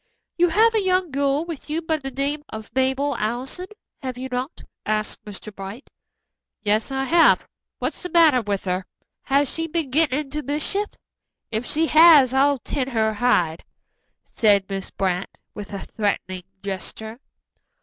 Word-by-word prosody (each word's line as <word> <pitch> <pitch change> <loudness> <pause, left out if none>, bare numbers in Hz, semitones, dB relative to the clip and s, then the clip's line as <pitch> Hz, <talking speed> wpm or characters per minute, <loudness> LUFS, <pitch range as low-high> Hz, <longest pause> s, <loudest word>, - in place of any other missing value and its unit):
"You 350 0 +4
have 445 +6 +4
a 440 - +2
young 370 -3 +1
girl 280 +3 +1
with 330 -3 -8
you 310 +2 0
by 320 -1 -1
the 270 -3 -6
name 280 +3 -2
of 220 -1 -8
Mabel 265 +2 +1
Allison, 250 +11 -3 0.3
have 255 -2 -5
you 260 +1 -5
not?" 255 +5 -4 0.2
asked 215 0 -2
Mr. 210 0 -9
Bright. 195 +7 -9 0.7
"Yes, 215 +2 +1
I 270 0 -1
have. 330 +4 +4 0.3
What's - - -3
the 360 - -5
matter 320 -8 +5
with 200 -3 -2
her? 185 0 -1 0.4
Has 280 +2 +2
she 325 +5 -3
been 325 -4 -2
gettin' 290 -2 +2
into 300 +1 -5
mischief? 305 +9 -2 0.6
If 225 +2 -2
she 320 +2 +1
has, 310 -5 +7
I'll 280 +1 +4
tan 260 +1 -3
her 220 -4 +1
hide," 180 -8 +1 0.7
said 200 -3 +4
Miss 195 -1 -4
Brant, 185 -1 -1 0.2
with 210 -1 -8
a 200 -1 -5
threatening 185 -4 -2 0.2
gesture. 220 +4 -6
265 Hz, 160 wpm, -23 LUFS, 215-305 Hz, 0.7 s, has